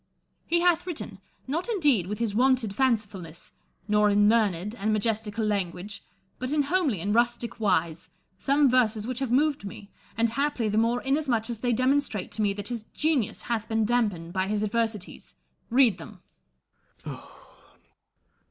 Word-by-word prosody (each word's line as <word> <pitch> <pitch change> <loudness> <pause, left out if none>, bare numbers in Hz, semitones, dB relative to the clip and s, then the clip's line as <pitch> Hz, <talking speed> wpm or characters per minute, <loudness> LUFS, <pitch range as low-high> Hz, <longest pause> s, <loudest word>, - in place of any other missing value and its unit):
He 340 0 +2
hath 350 0 +2
written, 345 -3 -5 0.3
not 330 - -2
indeed 290 - +3
with 210 +2 -3
his 225 -2 -1
wonted 250 -2 +2
fancifulness, 205 -10 -2 0.4
nor 210 0 +3
in 205 0 +4
learned 210 -3 +2
and 215 -2 -1
majestical 215 0 -1
language, 200 -1 -3 0.4
but 255 +1 -3
in 300 -1 +2
homely 285 - 0
and 205 +4 -1
rustic 235 0 0
wise, 175 -6 0 0.3
some 280 +8 +3
verses 230 -4 +2
which 250 +1 -3
have 270 -3 -2
moved 285 +1 +2
me, 200 0 -9 0.3
and 230 0 +2
haply 265 -2 -1
the 210 +1 +2
more 235 +2 +1
inasmuch 265 -5 0
as 230 - -5
they 245 +1 0
demonstrate 255 -3 0
to 220 - -2
me 205 -1 +2
that 205 0 -6
his 240 -2 -3
genius 300 -9 0
hath 225 -2 -3
been 220 -1 +1
dampened 205 -8 0
by 190 0 0
his 210 +1 -1
adversities. 220 -2 -3 0.3
Read 240 -5 +4
them. 205 -5 -12
225 Hz, 155 wpm, -26 LUFS, 205-260 Hz, 0.4 s, in